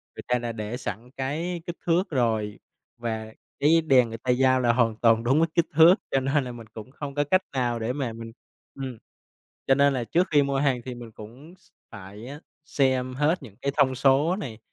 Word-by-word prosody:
người - - -8
ta 125 0 +1
đã 120 -1 -4
để 110 +1 -5
sẵn 110 +2 -6
cái 165 +6 -3
kích 175 - -5
thước 175 +3 +1
rồi, 110 -6 -1 0.4
và 110 -2 -5 0.3
cái 165 +3 +4
đèn 125 -4 +5
người 115 - -6
ta 125 +2 -1
giao 130 +1 +3
là 120 -2 +3
hoàn 115 -3 +2
toàn 115 0 +3
đúng 135 +6 +3
với 165 - +3
kích 170 -1 +3
thước, 165 +4 +8 0.2
cho 135 - +2
nên 135 +2 0
là 125 - -6
mình 115 -2 -10
cũng 110 +3 -10
không 140 0 -7
có 145 - +2
cách 185 +6 +2
nào 120 -3 -1
để 115 +3 -2
mà 130 -5 -3
mình 115 0 -9 0.4
ừm. 130 -3 -6 0.7
Cho 135 - +5
nên 140 0 +4
là 125 -3 -2
trước 175 +9 +1
khi 145 -2 +4
mua 140 -1 -1
hàng 135 -3 +1
thì 125 - -6
mình 120 -2 -10
cũng 125 +12 -13
x - - -28 0.2
phải 100 +4 -10 0.4
xem 130 -4 0
hết 150 +5 +1
những 110 -6 -12
cái 140 - -1
thông 130 -1 +3
số 140 +7 +3
này, 125 - -6
130 Hz, 220 wpm, -25 LUFS, 115-145 Hz, 0.7 s, thước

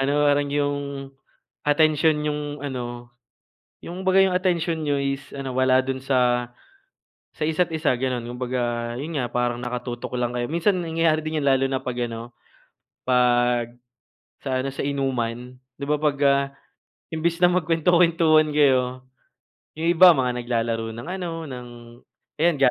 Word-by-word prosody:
ano 135 +1 +1 0.2
parang 145 0 +2
'yong, 145 0 0 0.9
atensyon 150 0 +3
niyong 150 -1 -4
ano, 120 -2 -6 0.7
'yong 180 +2 -7
kumbaga 190 0 +3
'yong 190 -1 +2
atensyon 170 -3 0
niyo 145 -2 0
is 140 0 -2
ano 135 -2 -5
wala 130 0 +4
do'n 130 0 -4
sa, 125 -2 +1 0.9
sa 155 - -2
isa't 160 +3 +1
isa 155 -4 +1
gano'n. 125 -2 -2
Kumbaga 120 -1 -2
'yun 155 +3 -5
nga 120 - -2
parang 120 0 -1
nakatutok 125 0 -5
lang 120 -1 -1
kayo, 120 0 -2
minsan 170 +4 +1
nangyayari 165 -1 +1
din 155 0 -3
'yun - - -3
lalo 135 0 +3
na 135 -1 -1
'pag 125 -1 -4
ano, 115 +1 -8 0.8
'pag 120 -1 +2 0.7
sa 130 -2 -1
ano - - -1
sa - - -4
inuman 125 -3 -2 0.2
'di 140 - -8
ba, 150 0 +1
'pag, 150 -2 +1
ah, 140 0 +4 0.6
imbis 165 +2 -1
na 180 - +6
magkuwento-kwentuhan 165 -2 +3
kayo 130 -3 +2 0.8
yung 165 - 0
iba 175 +1 +8
mga 125 -3 0
naglalaro 115 -1 -1
ng 120 +8 -8
ano 175 -2 -4 0.2
ng 125 -2 -8 0.7
ayan 170 +1 +3
ga 135 -2 +5
140 Hz, 150 wpm, -23 LUFS, 125-155 Hz, 0.9 s, iba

